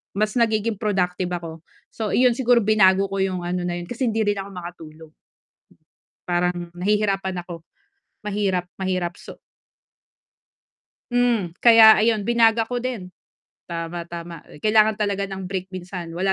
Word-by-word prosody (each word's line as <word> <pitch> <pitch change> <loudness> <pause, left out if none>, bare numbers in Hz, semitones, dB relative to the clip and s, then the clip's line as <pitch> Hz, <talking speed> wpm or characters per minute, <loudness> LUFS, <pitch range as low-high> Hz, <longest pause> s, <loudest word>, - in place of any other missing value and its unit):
mas 215 +1 0
nagiging 220 -2 0
productive 185 -4 -1
ako. 165 -1 -7 0.3
So, 220 -2 -4
iyon 250 0 +5
siguro 245 -2 +3
binago 195 -2 +3
ko 195 - -2
yung 185 -2 -1
ano 180 +1 -2
na 175 - -2
'yon, 175 - -7
kasi 245 +1 -2
hindi 220 0 0
rin 205 -1 0
ako 195 - -6
makatulog. 160 -3 -10 1.2
Parang 175 0 -1
nahihirapan 195 -1 0
ako, 170 -2 -9 0.6
mahirap, 195 -3 -1
mahirap. 185 -2 -2
So - - -12 1.7
Hmm, 235 -8 0
kaya 225 -2 +9
ayun, 220 -1 +2
binago 230 -1 +3
ko 245 - -3
din. 235 -8 -4 0.6
Tama, 170 0 -5
tama, 170 0 -8
eh, 150 - -15
kailangan 215 0 +4
talaga 200 -2 -1
ng 190 -1 -6
break 185 0 -4
minsan, 180 -1 -7
wala 190 +2 +1
195 Hz, 145 wpm, -22 LUFS, 175-220 Hz, 1.7 s, kaya